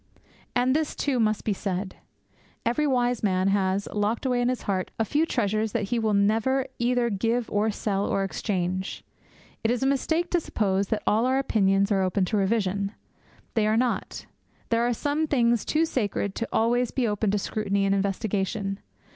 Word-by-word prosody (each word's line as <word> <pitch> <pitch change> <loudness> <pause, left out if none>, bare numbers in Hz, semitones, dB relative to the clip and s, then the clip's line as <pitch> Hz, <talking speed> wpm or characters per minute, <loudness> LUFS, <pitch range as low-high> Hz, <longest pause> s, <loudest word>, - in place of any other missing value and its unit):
And 255 +2 +3
this, 310 -1 0
too, 270 -4 0
must 215 -1 +1
be 215 - 0
said. 190 -1 -4 0.7
Every 295 +6 +1
wise 245 -3 +1
man 190 -2 +2
has, 195 0 +1
locked 210 +4 -1
away 250 -2 +1
in 245 - +2
his 255 - -2
heart, 190 -2 -1
a 225 - +1
few 300 +7 +1
treasures 215 -3 0
that 210 -4 -1
he 240 - +1
will 215 -2 +1
never 225 +6 +2
either 240 0 +1
give 230 +4 0
or 210 +2 +2
sell 200 -1 -1
or 195 - 0
exchange. 185 -1 -2 0.6
It 225 - +2
is 245 +2 0
a - - +2
mistake 320 +5 0
to 350 - +3
suppose 200 - 0
that 220 - -2
all 225 +4 +3
our 260 +1 +2
opinions 200 -6 +2
are 195 -1 +3
open 185 +1 +1
to 210 +3 -1
revision. 200 -1 0 0.6
They 215 -2 +2
are 215 +1 +2
not. 245 0 -1 0.4
There 230 +1 +2
are - - +1
some 295 +5 0
things 235 -5 +2
too 315 +1 +2
sacred 205 -8 -1
to 230 - -2
be - - -15
always 240 +2 +2
open 215 -4 +1
to 205 - +1
scrutiny 200 -1 -1
and 195 - +2
investigation. 195 0 -1
220 Hz, 185 wpm, -26 LUFS, 200-245 Hz, 0.7 s, And